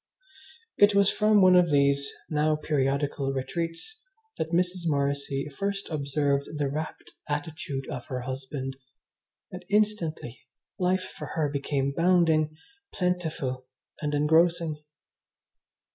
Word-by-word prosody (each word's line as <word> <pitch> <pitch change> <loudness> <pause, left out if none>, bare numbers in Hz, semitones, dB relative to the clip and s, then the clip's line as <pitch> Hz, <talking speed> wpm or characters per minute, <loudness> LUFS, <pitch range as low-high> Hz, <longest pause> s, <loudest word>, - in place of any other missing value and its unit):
It 205 0 +6
was 200 0 +5
from 210 -2 +4
one 185 0 +7
of 180 -1 +5
these, 140 -1 +3 0.2
now 155 0 +2
periodical, 140 -2 0
retreats 165 - -4 0.4
that 160 - -1
Mrs. 180 0 0
Morrissy 140 -1 0
first 200 +2 -2
observed 140 0 -1
the 145 -2 0
rapt 155 +2 -5 0.2
attitude 145 -2 -4
of 125 - -6
her 125 -1 -3
husband, 130 +1 -5 0.7
and, 180 0 -8
instantly, 200 - 0 0.4
life 185 0 +2
for - - -8
her 155 -3 +1
became 140 -1 -1
bounding, 165 -3 +3 0.3
plentiful, 160 -8 -2 0.3
and 150 -1 -1
engrossing. 160 +1 +3
155 Hz, 115 wpm, -27 LUFS, 140-180 Hz, 0.7 s, one